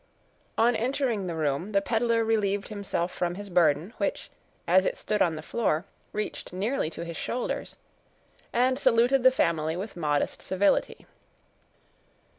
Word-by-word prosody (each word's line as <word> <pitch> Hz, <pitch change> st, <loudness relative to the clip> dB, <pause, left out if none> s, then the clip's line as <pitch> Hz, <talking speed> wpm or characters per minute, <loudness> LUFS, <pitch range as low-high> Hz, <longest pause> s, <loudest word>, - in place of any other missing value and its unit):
On 235 Hz, +1 st, +4 dB
entering 235 Hz, -4 st, 0 dB
the 170 Hz, -, -3 dB
room, 155 Hz, +6 st, -1 dB
the 200 Hz, -, +4 dB
peddler 230 Hz, 0 st, +1 dB
relieved 205 Hz, -3 st, 0 dB
himself 200 Hz, -4 st, -2 dB
from 175 Hz, 0 st, -1 dB
his 200 Hz, 0 st, -8 dB
burden, 165 Hz, +3 st, +3 dB
which, -, -, -2 dB, 0.4 s
as -, -, +5 dB
it -, -, -1 dB
stood 215 Hz, -, -1 dB
on 165 Hz, -2 st, +3 dB
the 155 Hz, -, -7 dB
floor, 185 Hz, -4 st, 0 dB, 0.3 s
reached 210 Hz, 0 st, -4 dB
nearly 195 Hz, -, -1 dB
to 170 Hz, +1 st, -7 dB
his 170 Hz, -1 st, -6 dB
shoulders, 245 Hz, -, -3 dB, 0.8 s
and 255 Hz, +2 st, +2 dB
saluted 250 Hz, +2 st, +4 dB
the 260 Hz, -, +8 dB
family 160 Hz, -9 st, 0 dB
with 200 Hz, +3 st, -6 dB
modest 150 Hz, -4 st, -1 dB
civility. 190 Hz, +2 st, +1 dB
200 Hz, 145 wpm, -27 LUFS, 170-235 Hz, 0.8 s, the